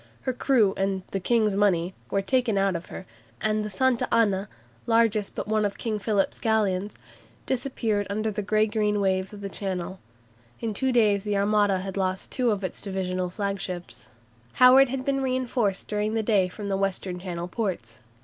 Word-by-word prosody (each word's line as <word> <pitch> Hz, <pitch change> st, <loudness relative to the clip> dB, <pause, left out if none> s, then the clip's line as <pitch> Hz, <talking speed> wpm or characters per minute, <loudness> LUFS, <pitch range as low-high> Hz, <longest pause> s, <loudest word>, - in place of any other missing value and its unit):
Her 260 Hz, -, -2 dB
crew 235 Hz, -6 st, +3 dB
and 195 Hz, -1 st, -1 dB
"the 195 Hz, -, -1 dB
King's 215 Hz, 0 st, +2 dB
money" 185 Hz, -3 st, +2 dB, 0.2 s
were 195 Hz, -, 0 dB
taken 245 Hz, -2 st, +1 dB
out 195 Hz, -1 st, +2 dB
of 170 Hz, +1 st, -5 dB
her, -, -, -8 dB, 0.3 s
and 215 Hz, 0 st, 0 dB
the 210 Hz, -, -4 dB
"Santa 250 Hz, +4 st, +1 dB
Ana," 205 Hz, -4 st, +2 dB, 0.4 s
largest 225 Hz, -3 st, +2 dB
but -, -, -4 dB
one 215 Hz, 0 st, +1 dB
of 205 Hz, -1 st, -1 dB
King 220 Hz, -2 st, -2 dB
Philip's 200 Hz, -1 st, 0 dB
galleons, 210 Hz, -3 st, 0 dB, 0.5 s
disappeared 230 Hz, -6 st, -1 dB
under 215 Hz, +2 st, -1 dB
the 210 Hz, +1 st, -3 dB
grey 215 Hz, +1 st, +2 dB
green 210 Hz, -1 st, 0 dB
waves 190 Hz, -1 st, 0 dB
of 205 Hz, -1 st, -10 dB
the 200 Hz, -, -4 dB
Channel. 185 Hz, -1 st, -3 dB, 0.6 s
In 225 Hz, -2 st, -2 dB
two 260 Hz, +6 st, 0 dB
days 210 Hz, -5 st, +3 dB
the 210 Hz, -1 st, 0 dB
Armada 200 Hz, -1 st, +2 dB
had 195 Hz, 0 st, -5 dB
lost 185 Hz, -1 st, -2 dB
two 250 Hz, -3 st, +1 dB
of 205 Hz, -3 st, -1 dB
its 185 Hz, -, -5 dB
divisional 185 Hz, -2 st, -2 dB
flagships. 185 Hz, -, -5 dB, 0.5 s
Howard 255 Hz, +1 st, +7 dB
had 260 Hz, 0 st, -3 dB
been 275 Hz, -1 st, 0 dB
reinforced 255 Hz, -6 st, -1 dB
during 210 Hz, +1 st, -1 dB
the 220 Hz, -, +1 dB
day 205 Hz, -4 st, +3 dB
from 200 Hz, +3 st, -7 dB
the 195 Hz, -1 st, 0 dB
Western 190 Hz, -2 st, -2 dB
Channel 175 Hz, -1 st, -5 dB
ports. 175 Hz, -, -4 dB
205 Hz, 180 wpm, -26 LUFS, 190-225 Hz, 0.6 s, Howard